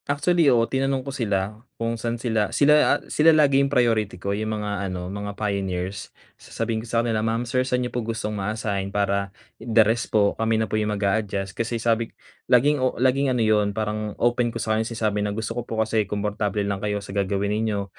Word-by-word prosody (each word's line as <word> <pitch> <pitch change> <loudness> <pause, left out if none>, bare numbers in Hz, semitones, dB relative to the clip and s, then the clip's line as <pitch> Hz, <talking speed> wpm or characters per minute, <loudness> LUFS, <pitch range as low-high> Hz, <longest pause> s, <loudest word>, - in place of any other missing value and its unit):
Actually, 160 +2 +3
oo. 120 -3 +4
Tinanong 135 +1 -1
ko 140 - -5
sila, 105 -4 -2 0.2
kung 115 0 -1
saan 115 +1 -3
sila, 110 -3 0
sila 150 +1 +4 0.2
a - - -17
sila 155 +1 +4
lagi 140 -2 +4
'yong 140 - +1
priority 115 -7 +1
ko 100 +2 -3
'yong 110 +1 -2
mga 100 -2 -3
ano, 90 0 -5
mga 100 0 -5
pioneers. 95 -2 -3 0.3
Sasabihin 115 -1 -3
ko 115 - -11
sa 115 0 +1
kanila, 110 -2 0
"Ma'am, 115 +2 -1
sir, 125 +2 0
sa'n 125 -1 0
n'yo 125 - -6
po 120 - -1
gustong 110 -1 -3
ma-assign? 100 -1 -2
Para, 100 -1 0 0.3
the 115 -1 +4
rest 115 +2 0
po 100 -2 +3
kami 110 0 +2
na 110 - +1
po - - -11
'yong 105 -1 +1
mag-a-adjust." 100 -1 -1
kasi 115 +1 -2
sabi 115 0 0 0.4
laging 140 +3 +4
o 130 - 0
laging 130 +2 +2
ano 125 -3 +1
'yon, 105 -1 +2
parang 105 -1 -3
open 120 0 +2
ko - - -6
sa 110 - -1
kanya 110 +1 0
sinasabi 110 -3 -1
na 105 0 -2
gusto 110 -1 -3
ko 120 - -3
po 110 - -3
kasi 110 -2 0
komportable 105 0 -1
lang 100 -1 -2
kayo 105 -1 -1
sa 100 -1 -8
gagawin 100 +1 0
ninyo. 105 -2 -1
110 Hz, 215 wpm, -24 LUFS, 100-120 Hz, 0.4 s, oo